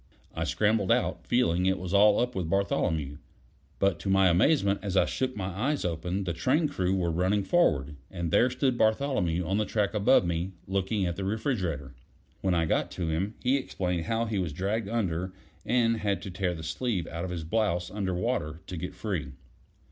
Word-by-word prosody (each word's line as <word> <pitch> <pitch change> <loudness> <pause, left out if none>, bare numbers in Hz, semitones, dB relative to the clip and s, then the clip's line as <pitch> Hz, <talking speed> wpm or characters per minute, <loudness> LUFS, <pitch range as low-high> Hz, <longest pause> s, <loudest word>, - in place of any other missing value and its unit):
I 80 - -2
scrambled 105 +1 +1
out, 125 +1 0
feeling 90 -7 +2
it 95 0 +2
was 90 0 -5
all 105 +1 +6
up 125 +1 0
with 90 -6 -3
Bartholomew; 80 -6 0 0.6
but 95 -4 +1
to 95 - -4
my 95 -1 +5
amazement, 100 - +3
as 100 -2 -2
I - - +5
shook 130 -1 -2
my 95 -2 -2
eyes 125 - -1
open 90 +3 -2
the 90 -2 -2
train 150 - +2
crew 95 -10 0
were 85 -3 0
running 95 +5 +1
forward, 75 - +2
and 85 -3 -4
there 125 - +4
stood 130 -1 0
Bartholomew 110 - +1
on 95 +4 0
the - - +2
track 105 -2 0
above 105 0 +4
me, 85 +2 -2
looking 95 +1 0
at 85 -1 -2
the 100 - -3
refrigerator. 95 - -2 0.5
When 95 -2 +1
I 85 -1 +2
got - - 0
to 85 -3 -2
him, 95 +7 -1
he 130 +2 +3
explained 90 -10 -2
how 115 +3 0
he 110 -3 -1
was 85 -5 -2
dragged 100 +5 -2
under 95 -5 -1 0.3
and 115 -1 +3
had 100 -2 -1
to 100 - -6
tear 90 -1 -1
the 80 - -8
sleeve 100 0 -2
out 85 +1 -5
of 95 - -3
his 85 -2 -4
blouse 90 -1 0
under 95 -3 -2
water 90 -5 -2
to 90 - -6
get 90 +2 -5
free. 90 -9 -3
95 Hz, 200 wpm, -28 LUFS, 85-110 Hz, 0.6 s, all